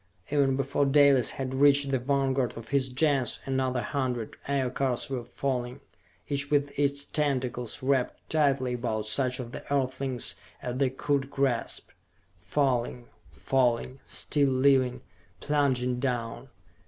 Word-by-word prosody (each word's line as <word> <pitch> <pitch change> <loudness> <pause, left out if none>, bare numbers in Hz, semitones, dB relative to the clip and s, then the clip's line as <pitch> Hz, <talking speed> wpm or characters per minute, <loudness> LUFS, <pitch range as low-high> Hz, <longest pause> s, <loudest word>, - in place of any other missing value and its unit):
Even 140 -2 +3
before 140 +1 +1
Dalis 140 -3 +5
had 130 -1 -4
reached 140 0 +4
the 135 - +2
vanguard 135 -2 0
of 115 - -9
his 135 -1 +1
Gens 135 -1 +1
another 130 -2 0
hundred 125 -5 -2
Aircars 135 -2 -1
were 125 -3 -2
falling, 125 +1 -3 0.5
each 140 0 -2
with 145 -1 +2
its 140 0 +1
tentacles 130 -5 -1
wrapped 130 -2 0
tightly 140 -5 +2
about 115 -3 -2
such 125 +4 0
of 120 -2 -6
the - - -7
earthlings 130 -2 -1 0.3
as 125 0 -4
they 135 -1 +2
could 135 +1 -1
grasp. 135 -4 -1 0.5
Falling... 125 +1 -1 0.2
falling... 130 0 0
still 140 -2 +1
living, 130 -1 +3 0.4
plunging 130 -4 +1
down. 125 0 -3
130 Hz, 130 wpm, -28 LUFS, 125-140 Hz, 0.5 s, Dalis